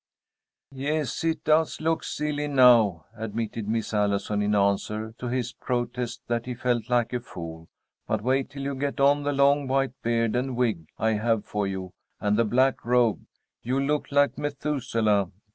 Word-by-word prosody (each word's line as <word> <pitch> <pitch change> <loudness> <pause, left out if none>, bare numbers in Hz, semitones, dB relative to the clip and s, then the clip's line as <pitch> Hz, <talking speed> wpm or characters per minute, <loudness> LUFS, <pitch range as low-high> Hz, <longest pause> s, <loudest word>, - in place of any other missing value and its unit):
"Yes, 145 +1 -2
it 165 0 0
does 155 +1 +2
look 160 +1 0
silly 150 0 -2
now," 120 - +5
admitted 110 -1 -4
Miss 110 0 -2
Allison 105 0 0
in 105 0 +1
answer 105 +2 0
to 125 - -4
his 125 0 -2
protest 120 -1 -3
that 120 0 -2
he 125 - -3
felt 120 -1 -1
like 120 -1 +1
a 125 - 0
fool. 80 -7 -9 0.4
"But 110 -1 -1
wait 130 +2 +1
till 140 0 -7
you 140 0 -2
get 140 +1 -3
on 140 +1 +4
the 145 0 -1
long 140 0 +3
white 135 -1 +1
beard 115 -1 +1
and 125 +1 -1
wig 110 -11 0
I 110 - +1
have 110 0 0
for 105 -1 -2
you, 95 -1 -5 0.3
and 105 0 +1
the 115 +1 +3
black 130 +5 +2
robe. 120 -2 +2 0.3
You'll 130 +3 0
look 150 +1 -1
like 145 0 +2
Methuselah. 120 -9 0
120 Hz, 170 wpm, -26 LUFS, 110-140 Hz, 0.4 s, now